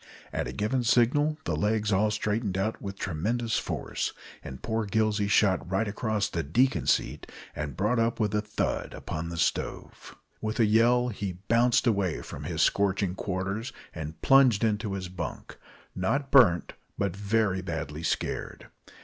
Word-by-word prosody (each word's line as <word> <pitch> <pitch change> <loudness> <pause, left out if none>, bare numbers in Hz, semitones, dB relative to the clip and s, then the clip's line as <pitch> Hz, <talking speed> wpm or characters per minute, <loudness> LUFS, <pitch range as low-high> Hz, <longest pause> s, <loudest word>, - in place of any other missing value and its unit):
At - - -1
a - - -4
given 110 - -1
signal 130 +6 +3
the 80 - -1
legs 105 +4 +1
all 105 +3 +3
straightened 105 -2 -1
out 110 +3 -1
with 100 -1 -6
tremendous 110 +8 -1
force, - - -3 0.3
and 65 - -9
poor 110 -1 -1
Gillsey 105 0 +1
shot 100 -4 +2
right 95 +4 0
across 105 0 -1
the 85 - -2
"deacon 125 - +1
seat" - - 0 0.2
and 75 -3 -5
brought 105 +5 +1
up 115 +1 +1
with 105 -2 0
a 105 - +2
thud 105 0 -2
upon 80 +2 -5
the 85 - -6
stove. - - -3 0.3
With 110 +1 -3
a 115 - +6
yell, 120 +3 +4
he 100 -4 -4
bounced 120 +2 +3
away 100 -8 +1
from - - -8
his - - 0
scorching 100 -2 +1
quarters 100 +4 -3 0.2
and 80 +1 -7
plunged 130 -6 +5
into 105 -2 0
his 95 -1 -4
bunk, 90 -3 -7 0.3
not 135 +10 -1
burnt, 100 -11 +5 0.2
but 100 -2 -1
very 100 -1 +1
badly 80 -4 -5
scared. 80 - -3
105 Hz, 160 wpm, -28 LUFS, 95-115 Hz, 0.3 s, a